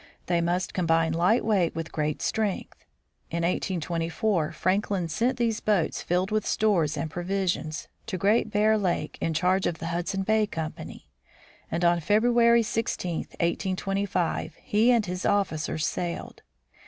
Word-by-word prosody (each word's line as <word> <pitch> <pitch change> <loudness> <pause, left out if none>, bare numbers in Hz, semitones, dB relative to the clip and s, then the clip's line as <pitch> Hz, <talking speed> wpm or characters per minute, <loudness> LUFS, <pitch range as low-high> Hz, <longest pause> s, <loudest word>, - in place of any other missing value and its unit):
They 175 -1 +1
must 175 +1 -1
combine 165 -2 +2
light 180 +8 +2
weight 195 -6 +2
with 165 0 -4
great 150 -1 -2
strength. 215 -3 -2 0.4
In 170 0 -2
1824 170 0 -1
Franklin 185 +1 0
sent 235 +11 0
these 230 -3 0
boats, 205 -7 0
filled 180 +3 0
with 215 -1 +1
stores 170 -8 +1
and 145 - -2
provisions, 175 -2 -2 0.2
to 195 -5 -3
Great 210 +5 +2
Bear 215 +1 +3
lake 175 -6 -2
in 165 - -1
charge 185 +3 +2
of 170 - -2
the 165 +2 -5
Hudson 185 +3 -1
Bay 220 +1 +2
Company; 160 -5 -6 0.6
and 170 +1 0
on 170 0 +4
February 235 +6 +4
16, 195 -6 -2 0.2
1825, 185 -2 -1
he 215 +4 +3
and 235 -3 +3
his 180 0 -4
officers 160 -6 0
sailed. 175 0 -4
180 Hz, 140 wpm, -27 LUFS, 165-210 Hz, 0.6 s, on